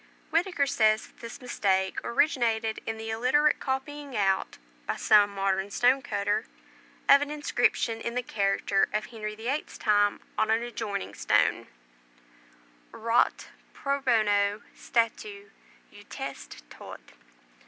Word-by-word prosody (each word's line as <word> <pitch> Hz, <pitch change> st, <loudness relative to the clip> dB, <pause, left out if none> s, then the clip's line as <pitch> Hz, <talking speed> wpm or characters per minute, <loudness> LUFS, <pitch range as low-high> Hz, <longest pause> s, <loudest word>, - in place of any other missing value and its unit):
Whitaker 335 Hz, -3 st, +1 dB
says 220 Hz, -5 st, +2 dB
that -, -, -22 dB
this 230 Hz, 0 st, -9 dB
mistake 190 Hz, -6 st, -1 dB
originated 230 Hz, -5 st, +1 dB
in 225 Hz, 0 st, -3 dB
the 225 Hz, 0 st, -5 dB
illiterate 260 Hz, +7 st, +2 dB
copying 275 Hz, 0 st, -4 dB
out, 195 Hz, -2 st, 0 dB, 0.3 s
by -, -, -1 dB
some 205 Hz, -1 st, +5 dB
modern 195 Hz, 0 st, -1 dB
stone 250 Hz, +6 st, +3 dB
cutter, 205 Hz, -2 st, -1 dB, 0.6 s
of 280 Hz, 0 st, +7 dB
an 290 Hz, -, -2 dB
inscription 245 Hz, -5 st, 0 dB
in 235 Hz, -, -4 dB
the 250 Hz, -, -1 dB
character 195 Hz, -2 st, +1 dB
of 215 Hz, 0 st, -1 dB
Henry 215 Hz, -2 st, -6 dB
the 220 Hz, +2 st, -8 dB
Eighth's 285 Hz, +4 st, -3 dB
time 205 Hz, -1 st, +2 dB, 0.2 s
on 220 Hz, -, +2 dB
an 225 Hz, +1 st, +2 dB
adjoining 210 Hz, -, -4 dB
stone: -, -, +1 dB, 1.2 s
"Orate 230 Hz, +1 st, +1 dB, 0.3 s
pro 280 Hz, 0 st, -2 dB
bono 205 Hz, -4 st, +2 dB
statu 210 Hz, -3 st, -2 dB, 0.4 s
Eutest -, -, -9 dB
Tod." -, -, -10 dB
225 Hz, 125 wpm, -27 LUFS, 205-255 Hz, 1.2 s, of